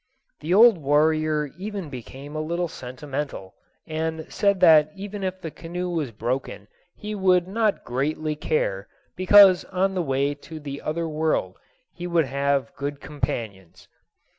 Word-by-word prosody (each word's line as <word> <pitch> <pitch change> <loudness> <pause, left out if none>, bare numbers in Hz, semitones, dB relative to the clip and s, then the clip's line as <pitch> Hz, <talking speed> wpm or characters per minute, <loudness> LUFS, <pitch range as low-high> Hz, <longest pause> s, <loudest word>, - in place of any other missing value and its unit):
The 155 - -5
old 215 0 +7
warrior 150 0 +2
even 195 -6 -5
became 135 +3 -9
a 155 - -1
little 170 +3 -2
sentimental, 130 - -6 0.3
and 160 0 -3
said 200 -2 +2
that 155 -3 +7
even 200 +1 -6
if 185 0 -3
the 165 -3 -6
canoe 175 +3 -5
was 160 -6 -2
broken 120 +4 -4 0.3
he 210 0 -6
would 185 -3 +3
not 215 +1 0
greatly 150 +5 -2
care, 100 -10 -1 0.3
because 185 0 +7
on 190 +1 0
the 185 - 0
way 140 -1 0
to 155 +2 -10
the 140 -1 -7
other 165 +2 -2
world 155 0 -1 0.3
he 175 0 -6
would 170 -3 +2
have 140 +1 -1
good 145 0 -4
companions. 110 - -5
155 Hz, 145 wpm, -24 LUFS, 140-180 Hz, 0.3 s, old